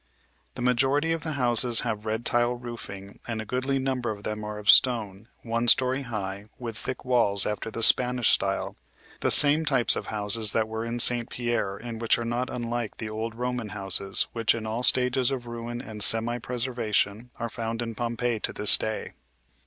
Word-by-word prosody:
The 120 - -7
majority 135 +5 0
of 165 0 -3
the 160 -1 -5
houses 120 -2 +6
have 105 0 -6
red 110 +2 -4
tile 120 0 -1
roofing 115 -5 -11
and 115 -2 -5
a 110 - -7
goodly 130 +4 -3
number 130 -2 -4
of 105 -1 -8
them 105 0 -6
are 105 0 -7
of 105 0 -11
stone, 110 -5 +3 0.2
one 115 +1 -3
story 130 +3 +2
high, 100 -5 -7
with 115 -3 -8
thick 130 +3 -8
walls 115 -6 +1
after 105 +1 -5
the 115 +1 -6
Spanish 125 0 +5
style - - -2 0.4
the - - -2
same 150 +2 +8
types 135 -6 +1
of - - -7
houses 105 0 +2
that 110 -1 -1
were 110 0 -6
in 115 +1 -6
St. 120 -1 +5
Pierre 120 -5 -4
and 115 0 -9
which 115 - +1
are 120 - -6
not 120 +2 -4
unlike 120 -2 -6
the 110 -1 -7
old 110 +1 -6
Roman 125 -2 -5
houses 95 -1 +1
which 115 -1 0
in 115 -1 -7
all 110 +2 -5
stages 125 0 +2
of 130 -3 -6
ruin 120 0 -8
and 105 -1 -9
semi 115 +3 +5
preservation 120 -2 -3
are 120 - -5
found 115 0 -7
in 115 -1 -7
Pompeii 120 0 -4
to - - -3
this 105 - +6
day. 110 0 -6
115 Hz, 190 wpm, -24 LUFS, 110-125 Hz, 0.4 s, same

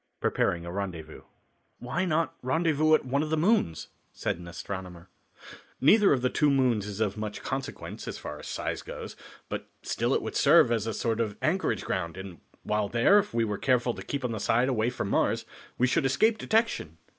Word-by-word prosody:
Preparing 85 -1 0
a 85 - -5
Rendezvous. 90 -5 -5 0.6
"Why 155 +9 -2
not 165 -1 0
rendezvous 155 +2 +3
at - - -1
one 135 +3 0
of 155 - -2
the 160 - +1
moons?" 155 - +1 0.2
said - - -3
an 90 - -10
astronomer. 90 0 -7 0.7
"Neither 200 - +6
of 130 -3 +2
the 125 - +3
two 150 - +3
moons 125 -7 +2
is 105 0 -6
of 110 -2 0
much 105 -1 -5
consequence, 135 -1 -5
as - - -4
far - - -7
as - - -9
size - - -3
goes, - - -8 0.3
but - - -5 0.2
still - - 0
it - - 0
would - - -5
serve - - +6
as 115 -2 0
a 110 - -1
sort 115 -1 -1
of 110 -3 -1
anchorage 185 +5 0
ground, 85 +2 -3
and 95 -3 -8 0.2
while 105 -1 0
there, 120 - +5
if 205 - -3
we 115 - +1
were 105 -2 -3
careful 125 -2 +2
to - - -8
keep 140 -2 -4
on 120 - -1
the 110 - -3
side 120 +5 +2
away 115 -2 +1
from 125 -5 -4
Mars, - - +1 0.3
we 125 - +3
should 140 +5 +2
escape 215 - +2
detection." 220 - 0
120 Hz, 200 wpm, -28 LUFS, 100-150 Hz, 0.7 s, Neither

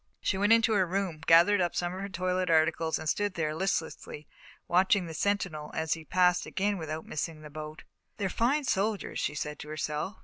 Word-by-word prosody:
She - - 0
went 205 +3 +2
into 230 -1 +5
her 190 -3 +2
room, 180 -4 -2
gathered 175 +4 +6
up 175 -1 0
some 175 0 -1
of 185 - -6
her 200 - -4
toilet 185 0 -1
articles, 160 0 +2
and 155 - -6
stood 205 +4 0
there, 155 -2 -1
listlessly, 160 -3 -3 0.4
watching 185 +2 +3
the 165 - -7
sentinel 175 -5 -1
as 160 0 0
he 165 - -7
passed 180 +3 +2
again 200 0 -1
without 155 0 -5
missing 155 0 -4
the 150 - -10
boat. 155 +1 -8 0.3
"They're 200 - -1
fine 255 +10 +1
soldiers," 215 -4 -1
she 150 - -2
said 150 +1 -4
to - - -8
herself. 155 +5 -3
175 Hz, 200 wpm, -29 LUFS, 155-195 Hz, 0.4 s, gathered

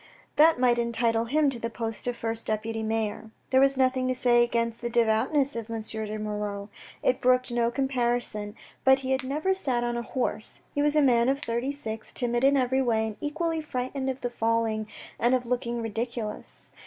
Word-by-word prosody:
That 320 +2 +6
might 245 -1 +3
entitle 230 -1 +1
him 290 +3 +2
to 245 - -5
the 230 - -3
post 225 0 -4
of 245 - -1
first 225 0 -4
deputy 220 +1 -2
mayor. 220 0 -2 0.2
There 260 0 +5
was 275 0 +4
nothing 255 -1 +2
to 255 - 0
say 240 -1 +4
against 230 -1 -1
the 240 - -2
devoutness 240 +5 +2
of 230 -1 -5
M. 225 -1 -3
de 215 -1 -5
Moirod. 210 -1 -4 0.3
It 250 - +2
brooked 255 0 +3
no 235 -1 +2
comparison, 240 -5 -1 0.3
but 265 0 +5
he 260 0 -3
had 265 +1 +1
never 300 +8 0
sat 260 -10 -1
on 240 0 -1
a - - -1
horse. 235 -3 -3
He 290 - 0
was 295 +1 +3
a 300 - +5
man 240 -2 +4
of 275 - +2
thirty 240 0 -2
six, 225 -6 -6
timid 240 -1 0
in 275 +1 +5
every 260 +1 +2
way, 225 -3 +1
and 215 -1 -5
equally 320 +2 -1
frightened 265 -1 -3
of 260 - -2 0.2
falling 225 -2 0 0.3
and 240 +2 +3
of 250 -1 -2
looking 235 -1 -2
ridiculous. 225 0 -5
240 Hz, 195 wpm, -27 LUFS, 225-265 Hz, 0.3 s, That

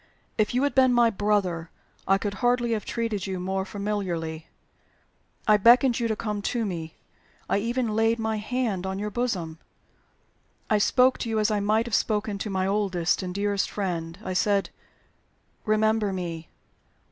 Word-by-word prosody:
"If 215 +2 0
you 255 - +2
had 285 - +1
been 260 -2 +5
my 235 -1 +5
brother, 190 -5 0 0.4
I 195 - +4
could 200 0 -3
hardly 245 -1 +2
have 215 -3 -1
treated 225 -5 -2
you 190 -1 -3
more 190 +1 -2
familiarly. 185 -6 -3 1.0
I 215 -1 +6
beckoned 240 +4 +6
to 235 - -2
you - - +2
to 220 - -1
come 210 -1 -3
to 230 +2 -1
me. 165 -5 -5 0.5
I - - +1
even 235 +2 -1
laid 225 +2 +2
my 220 -1 -1
hand 215 -4 -2
on 190 0 -3
your 210 +1 -3
bosom. 185 -10 -2 1.1
I 215 - +4
spoke 255 +5 +3
to 230 - -3
you 220 - 0
as 215 +1 +2
I 210 - +1
might 215 +3 +2
have 235 - -7
spoken 210 -1 0
to 210 - -3
my 190 -1 0
oldest 195 -4 0
and 185 -1 -4
dearest 200 +1 0
friend. 170 -4 -3
I 185 - -3
said, 200 +2 +1 1.0
'Remember 215 -1 +2
me. 170 -3 -5
210 Hz, 170 wpm, -26 LUFS, 190-225 Hz, 1.1 s, I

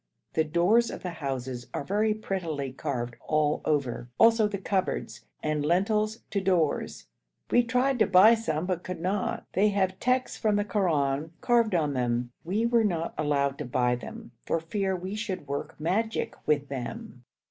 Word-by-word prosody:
The 160 - +3
doors 180 +9 +3
of - - -7
the 180 - -3
houses 130 -5 -4
are - - -2
very 210 +6 +1
prettily 165 -10 -3
carved 125 -4 -4
all 150 -1 +1
over, 130 -5 -1
also 225 -1 +5
the 205 -1 -3
cupboards, 190 -1 -2 0.2
and 155 -1 0
lintels 210 +7 +1
to 200 - 0
doors; 175 -6 0 0.5
we 245 - +6
tried 250 +2 +1
to - - +4
buy 195 +4 +7
some 180 -8 -1
but 180 -2 -1
could 180 -2 -6
not. 190 +4 -2
They 205 +3 +4
have 190 -2 0
texts 255 +1 0
from 215 -2 +2
the 205 0 +1
Koran 160 -7 0
carved 235 -5 +2
on 150 -4 +1
them. 120 -1 -1
We 205 +7 0
were 235 -1 +3
not 170 -5 -1
allowed 140 -2 0
to 150 - -3
buy 125 0 +1
them 120 - -9 0.2
for 165 - +1
fear 190 +3 -1
we 185 +2 -5
should 205 -7 -4
work 140 +1 -5
magic 205 +8 -1
with 145 -2 +2
them. 135 - -6
180 Hz, 170 wpm, -28 LUFS, 145-210 Hz, 0.5 s, buy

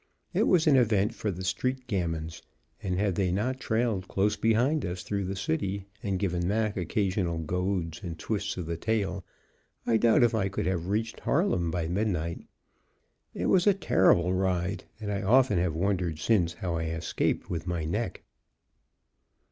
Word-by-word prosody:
It - - +2
was 175 -4 +4
an 150 -3 +5
event 110 -3 +3
for 110 - -3
the 95 -1 -4
street 130 +8 -1
gamins, 85 -7 -3 0.4
and, 90 -2 -2
had 100 -1 +1
they 90 0 0
not 120 +8 -1
trailed 110 -6 0
close 100 +2 +1
behind 120 +7 +2
us 90 0 -4
through 100 -1 -2
the 95 +2 -3
city 95 +1 -2 0.2
and 100 -2 -1
given 90 -2 -1
Mac 105 +1 0
occasional 95 -1 0
goads 90 0 -2
and 85 -4 -6
twists 100 +3 -3
of 90 - -3
the 85 0 -3
tail, 100 -1 -1 0.6
I 115 - +3
doubt 115 +1 +4
if 120 - +3
I 100 -3 +1
could 95 - -3
have 90 -2 -1
reached 110 +3 -1
Harlem 135 - +1
by 80 -1 -2
midnight. 90 -3 -2 0.9
It - - -2
was 185 +1 +3
a 200 - +6
terrible 90 - +3
ride, 95 0 -1
and 105 -2 -4
I 100 - -1
often 115 -2 +4
have 85 -3 0
wondered 90 -2 0
since 85 0 +2
how 85 -3 -3
I 80 - -2
escaped 80 +1 -1
with 85 +1 -3
my 85 -3 -2
neck. 100 +4 -3
95 Hz, 170 wpm, -28 LUFS, 85-110 Hz, 0.9 s, a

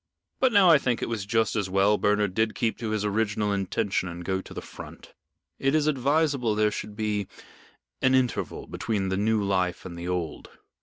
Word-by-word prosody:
But 260 - +3
now 200 -4 +6
I 155 - +7
think 125 -3 -1
it - - -2
was 110 -4 -3
just 115 0 +1
as 100 -4 -1
well 100 +2 +3
Bernard 105 -2 +1
did 110 +2 0
keep 115 -1 0
to 115 -2 -3
his 105 -1 -1
original 105 0 0
intention 95 -1 -1
and 85 0 -8
go 95 +1 -1
to - - -15
the - - -5
Front. - - -11 0.5
It 135 +2 +2
is 155 -1 +2
advisable 140 -4 +1
there 105 0 +2
should 105 0 -6
be 105 -2 -1 0.7
an 130 0 +4
interval 130 -2 -1
between 100 -4 -2
the 95 - -1
new 105 +1 +1
life 95 -2 -1
and 90 -2 -7
the 85 +1 -6
old." 90 -4 -3
105 Hz, 200 wpm, -26 LUFS, 95-120 Hz, 0.7 s, I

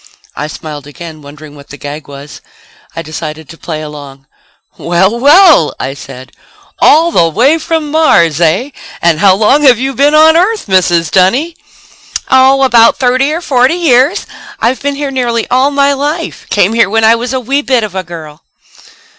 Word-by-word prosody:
I 150 - -5
smiled 150 -2 -9
again, 160 +1 -11
wondering 145 +1 -13
what 140 -1 -15
the 140 - -10
gag 145 +2 -9
was. 140 +1 -12 0.5
I 165 - -5
decided 155 0 -8
to 165 - -11
play 155 -2 -7
along. 140 -3 -11 0.5
"Well, 190 +7 0
well," 295 - +4
I 135 +1 -4
said, 130 -2 -12 0.5
"all 330 +3 +3
the 165 - +2
way 270 - +1
from 315 -2 -3
Mars, 170 - +2
eh? 175 - 0 0.3
And 165 -2 +1
how 190 0 +4
long 220 +8 +2
have 260 -5 +4
you 265 +2 -3
been 285 +4 +2
on 315 +1 +5
Earth, 400 +6 0
Mrs. 175 -4 +1
Dunny?" 250 - +1 0.8
"Oh, 265 +1 +4
about 235 -3 +4
thirty 255 +3 0
or 330 +3 -3
forty 260 0 +1
years. 310 +2 +1 0.3
I've 245 +3 -1
been 285 0 -3
here 280 -1 -4
nearly 240 -3 -2
all 260 +3 +2
my 280 0 +1
life. 295 +4 -5
Came 205 +1 +1
here 230 -3 +2
when 225 +2 0
I 220 +1 +5
was 235 +1 -3
a 260 - -2
wee 270 +4 -2
bit 255 -5 0
of 210 -3 -5
a 190 - -3
girl." 160 -3 -11
230 Hz, 180 wpm, -10 LUFS, -, 0.8 s, on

